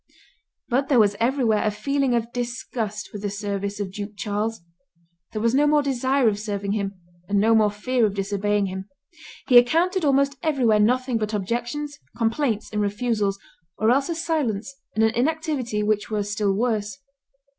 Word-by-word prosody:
But 265 +2 0
there 270 - +4
was 205 -2 +4
everywhere 235 -3 +2
a 215 - +2
feeling 265 +4 0
of 235 0 -2
disgust 235 -4 -4
with 205 - -6
the 205 - -2
service 200 0 -3
of 200 -2 -3
Duke 205 +2 -6
Charles; 210 0 -2 0.7
there 215 - -3
was 230 0 +2
no 290 +2 +4
more 295 0 +4
desire 265 -1 +1
of 205 -2 +1
serving 200 -2 -3
him 200 -1 -2 0.3
and 200 0 +2
no 220 +3 +4
more 215 -2 +5
fear 225 +3 +1
of 200 - -5
disobeying 205 +1 0
him; 190 +1 -6 0.6
he 245 -3 +9
encountered 340 +9 +2
almost 280 -1 +2
everywhere 250 -9 +2
nothing 250 +2 +2
but 215 0 -2
objections, 240 +8 -3 0.2
complaints, 230 -1 0
and 210 - 0
refusals, 205 -1 0 0.4
or 220 +2 +3
else 275 +5 +2
a 335 - -1
silence 275 -8 -1 0.2
and 220 - +3
an 220 0 +3
inactivity 265 -5 -1
which 210 0 0
were 210 -2 -1
still 205 0 0
worse. 215 0 -1
225 Hz, 170 wpm, -24 LUFS, 205-260 Hz, 0.7 s, he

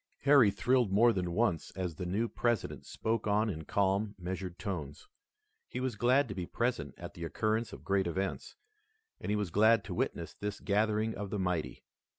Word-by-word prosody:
Harry 140 -6 +6
thrilled 125 +1 +2
more 115 +4 +5
than 90 -3 -1
once 90 -4 +1
as 90 -2 -2
the 90 +4 -5
new 105 +6 0
President 120 -2 -1
spoke 110 0 -2
on 105 +1 +2
in 80 -3 -6
calm, 100 +4 +1
measured 90 0 -5
tones. 80 -7 -5 0.6
He - - -5
was 130 -1 -2
glad 130 +3 +3
to 100 - -5
be 90 -3 -4
present 120 +1 -1
at - - -8
the 85 - -8
occurrence 110 +6 -1
of - - -10
great 95 -2 +1
events, 95 +3 -3 0.6
and - - -5
he 105 - +2
was 105 -4 -2
glad 110 +3 +5
to 95 - -6
witness - - -2
this 105 0 -5
gathering 110 +2 +1
of 100 -1 -5
the 105 - -2
mighty. 90 -4 -2
100 Hz, 185 wpm, -32 LUFS, 90-115 Hz, 0.6 s, Harry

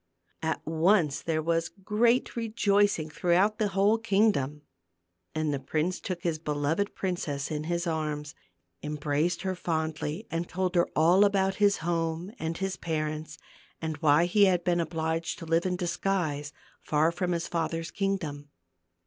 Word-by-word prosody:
At 160 0 -2
once 160 -1 +2
there 155 -1 -1
was 165 0 0
great 225 +5 +1
rejoicing 205 -7 +2
throughout 180 +7 +2
the 215 - +2
whole 200 +3 +3
kingdom. 195 -10 +1 0.7
And 155 -1 0
the 140 - -1
prince 155 +7 -1
took 180 -3 -5
his 165 -3 -1
beloved 150 +6 -1
princess 160 -6 -2
in 150 0 -3
his 170 +1 -1
arms, 150 -3 -2 0.5
embraced 150 +4 -1
her 190 -1 -1
fondly 160 +1 -2
and 165 +1 -2
told 185 -1 -1
her 175 -1 +3
all 175 +5 +5
about 195 -1 +2
his 205 -1 +5
home, 165 +2 -1
and 160 +1 -3
his 195 -1 -2
parents, 155 -1 -3 0.4
and 160 -1 -3
why 155 +1 +4
he 200 +3 +5
had 180 -2 +2
been 175 -1 +2
obliged 165 0 -2
to - - -8
live 165 +2 +2
in 180 - 0
disguise, 175 -5 -1 0.3
far 155 +2 +2
from 180 +1 -2
his 170 -1 -1
father's 165 0 -2
kingdom. 165 -8 -2
170 Hz, 150 wpm, -28 LUFS, 155-190 Hz, 0.7 s, all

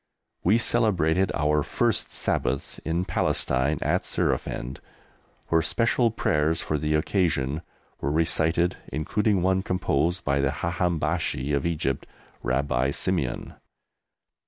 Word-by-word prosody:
We 100 +6 +4
celebrated 95 -7 +2
our 75 0 +2
first - - 0
Sabbath 70 +2 -1
in 85 +3 -1
Palestine 65 -1 +1
at - - +1
Surafend, 65 +3 -2 0.7
where 80 -1 +4
special 115 +5 +2
prayers 80 -8 +1
for 75 - -1
the 75 +1 0
occasion 75 -4 0 0.4
were 70 - -1
recited, 80 +2 +2
including 100 +5 +1
one 95 0 +2
composed 90 -1 0
by 70 0 +2
the 70 - +2
Haham 85 0 0
Bashi 70 -1 -1
of 70 +2 +1
Egypt, 75 -5 -1 0.3
Rabbi 65 0 +1
Simeon. - - -2
80 Hz, 115 wpm, -26 LUFS, 70-90 Hz, 0.7 s, We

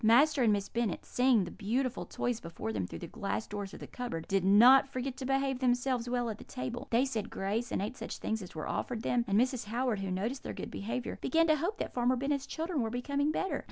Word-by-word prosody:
Master 275 +6 +5
and 230 -3 +5
Miss 200 -1 0
Bennet, 230 -6 -2
seeing 250 -4 +3
the 175 - -6
beautiful 245 +5 -1
toys 240 -2 -2
before 165 -10 -5
them 95 -4 -2
through - - -7
the - - -6
glass 210 +3 -3
doors 205 -1 -5
of - - -10
the - - -7
cupboard, 235 -11 -5
did 195 -1 +1
not 240 +8 +7
forget 260 -1 -4
to 260 - -4
behave 270 -1 +1
themselves 245 -1 +1
well 245 -1 0
at 215 - -9
table; 250 0 -5
they 240 +3 +3
said 230 -5 -3
grace 215 +5 -2
and - - 0
ate 220 +5 -4
such - - -5
things 220 0 -2
as 180 - -10
were 155 - -4
offered 235 -2 -2
them; 245 -1 +2
and 200 +2 +3
Mrs. 250 -2 +1
Howard, 235 0 0
who 195 -1 -3
noticed 215 +9 -2
their - - -5
good - - -6
behaviour, 230 +4 -4
began 330 +4 +3
to 310 -1 +4
hope 350 +8 -2
that - - -4
Farmer 245 +1 +2
Bennet's 275 +1 -1
children 325 -2 -2
were 225 - -1
becoming 280 +5 0
better. 380 +4 -1
245 Hz, 240 wpm, -32 LUFS, 210-265 Hz, -, not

